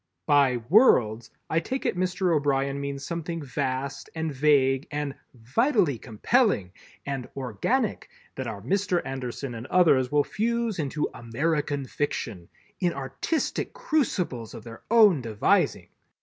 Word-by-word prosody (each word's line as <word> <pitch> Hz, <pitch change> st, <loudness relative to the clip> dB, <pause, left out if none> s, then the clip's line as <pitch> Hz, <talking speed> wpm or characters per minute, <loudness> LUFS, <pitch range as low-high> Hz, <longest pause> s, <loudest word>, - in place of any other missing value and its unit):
By 140 Hz, -4 st, +4 dB
"worlds" 120 Hz, -, +4 dB, 0.2 s
I 160 Hz, -, +1 dB
take 260 Hz, +11 st, -4 dB
it -, -, +1 dB
Mr. 180 Hz, -1 st, +1 dB
O'Brien 140 Hz, -1 st, 0 dB
means 140 Hz, 0 st, -4 dB
something 170 Hz, -1 st, -4 dB
vast 135 Hz, 0 st, -3 dB
and 160 Hz, -2 st, -2 dB
vague 135 Hz, -1 st, +3 dB
and 145 Hz, -1 st, -3 dB, 0.2 s
"vitally 155 Hz, -, +1 dB
compelling" 115 Hz, -, +1 dB, 0.3 s
and 135 Hz, -3 st, -4 dB
"organic" 135 Hz, -, -1 dB, 0.2 s
that 130 Hz, -2 st, -5 dB
our 100 Hz, -3 st, -6 dB
Mr. 185 Hz, -, 0 dB
Anderson 130 Hz, -1 st, -5 dB
and 115 Hz, +2 st, -7 dB
others 140 Hz, -8 st, +4 dB
will 145 Hz, 0 st, +4 dB
fuse 230 Hz, 0 st, -1 dB
into 150 Hz, 0 st, -1 dB
American 145 Hz, +4 st, -1 dB
Fiction 115 Hz, -, -4 dB, 0.3 s
"in 175 Hz, -2 st, +1 dB
artistic 140 Hz, -, -2 dB
crucibles 240 Hz, -, -1 dB
of 110 Hz, -, -9 dB
their 115 Hz, -1 st, -10 dB
own 210 Hz, -, +6 dB
devising." 110 Hz, -3 st, +1 dB
145 Hz, 130 wpm, -26 LUFS, 130-180 Hz, 0.3 s, own